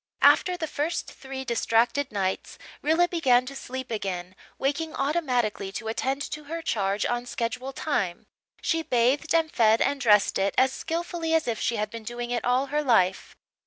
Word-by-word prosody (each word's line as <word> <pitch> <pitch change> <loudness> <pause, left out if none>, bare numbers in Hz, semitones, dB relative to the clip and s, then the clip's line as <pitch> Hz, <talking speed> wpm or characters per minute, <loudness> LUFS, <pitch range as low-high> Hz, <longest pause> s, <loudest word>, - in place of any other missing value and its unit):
After 360 -1 +5
the 330 - -2
first 310 +2 -2
three 265 -1 -7
distracted 235 +3 +1
nights 190 -2 -2 0.2
Rilla 325 +4 +3
began 260 -8 +3
to 275 +2 -7
sleep 260 -1 -6
again, 185 -4 -4 0.2
waking 300 +4 -1
automatically 250 - 0
to 220 - -5
attend 270 +5 -1
to 300 -1 -6
her 330 +3 -5
charge 200 -4 0
on 240 0 -2
schedule 245 +3 -3
time. 220 - -2 0.4
She 325 -1 +1
bathed 280 +2 +1
and 325 -1 +2
fed 225 -1 +4
and 275 0 +1
dressed 210 -4 +4
it 195 +1 0
as 260 0 +4
skilfully 330 0 -2
as 320 - +1
if 230 -2 -1
she 235 - 0
had 210 -1 -2
been 230 0 -6
doing 240 +2 -5
it 240 - -1
all 250 +2 +2
her 300 - +2
life. 205 -9 +2
255 Hz, 175 wpm, -26 LUFS, 225-300 Hz, 0.4 s, After